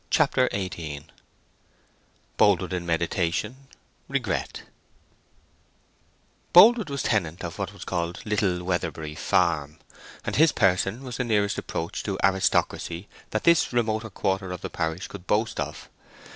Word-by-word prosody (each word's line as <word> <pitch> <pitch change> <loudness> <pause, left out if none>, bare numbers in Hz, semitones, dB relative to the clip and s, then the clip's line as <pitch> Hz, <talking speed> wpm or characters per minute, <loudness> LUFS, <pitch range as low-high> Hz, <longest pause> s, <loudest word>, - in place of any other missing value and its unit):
CHAPTER 135 -4 +3
XVIII 80 -7 -5 1.3
Boldwood 95 -2 +3
in 85 -1 -3
Meditation—Regret 105 +8 -3 1.9
Boldwood 215 +2 +8
was 140 -2 -3
tenant 90 -6 -1
of 85 +3 -6
what 95 -1 -3
was 100 - -10
called 85 -1 -2
Little 100 -4 0
Weatherbury 85 -4 -2
Farm, 80 -2 +1 0.5
and - - -2
his 160 +2 +6
person 95 +6 +1
was 125 -2 -6
the 125 - 0
nearest 105 -4 +1
approach 80 +1 -4
to 100 -2 -3
aristocracy 95 -1 0 0.2
that 110 - -2
this 170 -1 +4
remoter 110 -2 0
quarter 95 -1 -2
of 90 - -6
the - - -6
parish 80 +2 -3
could 95 -3 -11
boast 110 +2 0
of. - - -5
95 Hz, 125 wpm, -26 LUFS, 85-110 Hz, 1.9 s, Boldwood